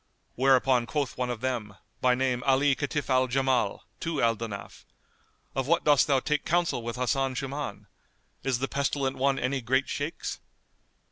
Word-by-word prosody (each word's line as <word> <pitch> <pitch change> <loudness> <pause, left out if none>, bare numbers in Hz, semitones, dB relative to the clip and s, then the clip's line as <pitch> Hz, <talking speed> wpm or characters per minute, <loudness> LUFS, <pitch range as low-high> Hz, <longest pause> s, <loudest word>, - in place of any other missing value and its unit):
Whereupon 130 -2 +3
quoth 135 +2 -2
one 125 -1 -2
of 120 -2 -4
them, 120 -6 -2 0.3
by 125 -1 +4
name 125 -1 0
Ali 135 +1 +4
Kitf 145 +1 -2
al 130 -1 +3
Jamal,[FN#209] 130 0 0
to 165 -3 -2
Al 115 -1 +4
Danaf, 105 -3 -7 0.7
"Of 135 -1 -2
what 170 +2 +3
dost 145 -5 +5
thou 140 -2 +3
take 150 +2 -1
counsel 170 -6 +1
with 115 0 -4
Hasan 130 +1 0
Shuman? 135 -4 -4 0.6
Is 135 -2 +1
the 135 +2 -2
Pestilent 140 -1 -1
one 135 +1 +2
any 130 +2 -1
great 130 +3 +1
shakes?" 150 +4 -4
130 Hz, 160 wpm, -28 LUFS, 125-140 Hz, 0.7 s, dost